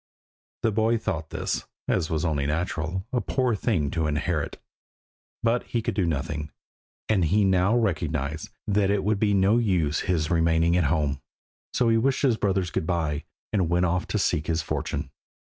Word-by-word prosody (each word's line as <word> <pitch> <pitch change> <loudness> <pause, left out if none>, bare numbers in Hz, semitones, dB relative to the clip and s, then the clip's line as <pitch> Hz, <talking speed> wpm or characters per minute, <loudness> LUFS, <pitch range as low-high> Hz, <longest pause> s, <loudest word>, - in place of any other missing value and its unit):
The 115 - +3
boy 110 +2 +2
thought 85 -8 -3
this, - - -2 0.2
as 80 -4 +1
was 80 0 -1
only 75 -4 0
natural, 80 +3 -2
a 125 - +2
poor 130 -3 0
thing 95 - 0
to 80 -2 0
inherit, 75 -1 -1 0.9
but 115 +1 +2
he 115 -2 -2
could - - -1
do 95 -5 +1
nothing, 75 0 -2 0.6
and 100 -6 +2
he 100 +5 +3
now 95 +4 +3
recognised 80 - -1 0.2
that 100 -1 +2
it 100 -1 +1
would 105 0 +1
be 105 -1 +2
no 100 +4 +4
use 90 -10 +1
his 80 -4 0
remaining 85 0 +3
at 90 -3 +3
home, 70 -2 0 0.5
so 120 -2 +2
he 115 - +4
wished 135 +4 +1
his 130 -5 +4
brothers 95 -5 0
good 80 - -2
bye, 80 -4 -1 0.3
and 95 -6 +2
went 90 +1 +2
off 90 +1 0
to - - -1
seek 80 -6 0
his 80 -1 0
fortune. - - -3
90 Hz, 175 wpm, -26 LUFS, 80-105 Hz, 0.9 s, no